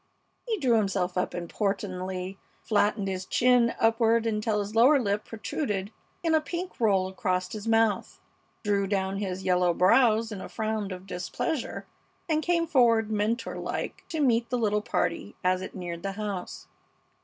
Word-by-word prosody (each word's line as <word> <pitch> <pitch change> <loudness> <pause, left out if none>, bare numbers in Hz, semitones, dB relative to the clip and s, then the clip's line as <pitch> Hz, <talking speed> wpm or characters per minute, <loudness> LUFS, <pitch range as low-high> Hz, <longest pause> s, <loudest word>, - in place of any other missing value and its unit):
He 450 -2 0
drew 255 - +3
himself 195 -4 0
up 180 - -1
importantly, 185 0 -3 0.2
flattened 205 -1 +1
his 190 -1 -3
chin 240 +3 +3
upward 225 0 +3
until 215 -1 0
his 205 +1 -4
lower 255 +6 +6
lip 205 -3 -1
protruded 210 -3 -3 0.3
in 330 -1 +2
a 315 - +4
pink 350 +3 -5
roll 195 -5 +3
across 185 -2 -2
his 215 0 -6
mouth, 225 -3 +1 0.4
drew 200 -2 +1
down 195 -1 -1
his 190 -2 -3
yellow 180 -1 +2
brows 225 +2 +4
in 200 -3 -5
a - - -7
frown 220 -2 -2
of 185 -1 -7
displeasure, 215 - -3 0.4
and 310 -2 +1
came 340 +1 +1
forward 230 -7 +3
mentor 215 +3 -1
like - - -4
to 320 -2 -2
meet 235 -4 +2
the 250 - 0
little 210 -2 +1
party - - -2
as 185 0 +2
it 190 - -7
neared 175 -2 -5
the 195 +1 -3
house. 200 -3 -5
210 Hz, 160 wpm, -27 LUFS, 190-230 Hz, 0.4 s, lower